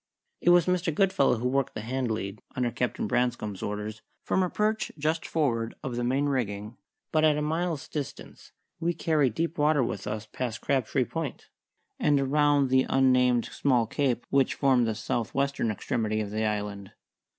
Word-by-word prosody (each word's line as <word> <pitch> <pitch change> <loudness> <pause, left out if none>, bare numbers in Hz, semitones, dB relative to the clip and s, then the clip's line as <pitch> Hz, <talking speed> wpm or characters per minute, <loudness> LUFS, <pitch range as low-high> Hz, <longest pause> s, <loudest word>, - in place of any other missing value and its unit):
It - - +3
was 175 -1 +6
Mr. 180 -2 +1
Goodfellow 150 -7 +3
who 120 +3 -1
worked 135 0 0
the - - -3
hand 125 +2 -2
lead, 105 -2 -4
under 125 -2 0
Captain 120 +1 -2
Branscome's 120 -4 -1
orders, 105 +1 -4 0.2
from 190 - +1
a 180 - +1
perch 215 +2 0
just 155 +3 -1
forward 115 -8 0
of 125 -3 -3
the 120 - -1
main 135 +4 +1
rigging; 110 -5 -2 0.4
but 155 0 +2
at 155 -1 +4
a - - -1
mile's 160 0 -1
distance 145 -4 -7 0.3
we 170 +1 0
carried 150 -8 +1
deep 165 -1 -2
water 150 -2 +3
with 105 -3 -4
us 105 +1 -3
past 115 0 -4
Crabtree 135 -1 +1
Point, 160 -2 -5 0.5
and 145 -2 +3
around 145 0 +3
the 130 0 +4
unnamed 125 -2 +3
small 125 -5 +1
cape 125 +1 -1
which 135 -2 +3
formed 130 -4 +3
the 110 - -1
south 110 0 -3
western 140 -4 0
extremity 110 +1 -1
of 105 -2 -3
the 110 +1 -1
island. 105 -2 -3
130 Hz, 175 wpm, -28 LUFS, 110-150 Hz, 0.5 s, was